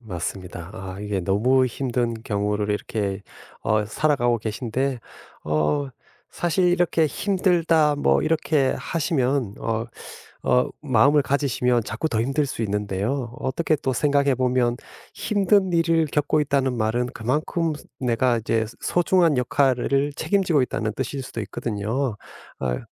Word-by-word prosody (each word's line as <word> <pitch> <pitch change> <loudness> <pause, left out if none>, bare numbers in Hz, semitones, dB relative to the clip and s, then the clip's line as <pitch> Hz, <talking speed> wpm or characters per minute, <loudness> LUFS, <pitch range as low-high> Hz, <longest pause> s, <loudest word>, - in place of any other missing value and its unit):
맞습니다. 90 -3 -6
아, 95 -2 -7
이게 105 -2 -2
너무 120 +8 +3
힘든 120 -2 -1
경우를 105 0 -1
이렇게 105 -1 -2 0.4
어 110 -1 +1
살아가고 120 0 +1
계신데 120 +4 -2 0.4
어 75 - 0 0.4
사실 175 +1 +1
이렇게 175 -2 +2
힘들다. 165 -5 +2
뭐 145 - +2
이렇게 155 -3 +1
하시면 135 - 0
어 115 +1 -2 0.6
어 125 - +3
마음을 140 +2 +4
가지시면 125 -4 +1
자꾸 110 +10 -3
더 110 -4 0
힘들 140 +3 0
수 115 - -4
있는데요. 105 +5 -2
어떻게 155 +5 0
또 135 -2 -1
생각해 140 0 +2
보면 125 -1 +1 0.4
힘든 200 -2 +2
일을 165 -1 +3
겪고 150 +1 +1
있다는 135 -3 +1
말은 120 +2 0
그만큼 155 +7 -1 0.3
내가 125 -1 +1
이제 110 0 0 0.2
소중한 175 -4 +2
역할을 135 +2 +1
책임지고 180 -8 +2
있다는 110 -3 -2
뜻일 135 +2 -3
수도 115 - -6
있거든요. 110 +4 -2 0.4
아 60 -2 -1
130 Hz, 285 characters per minute, -23 LUFS, 110-150 Hz, 0.6 s, 마음을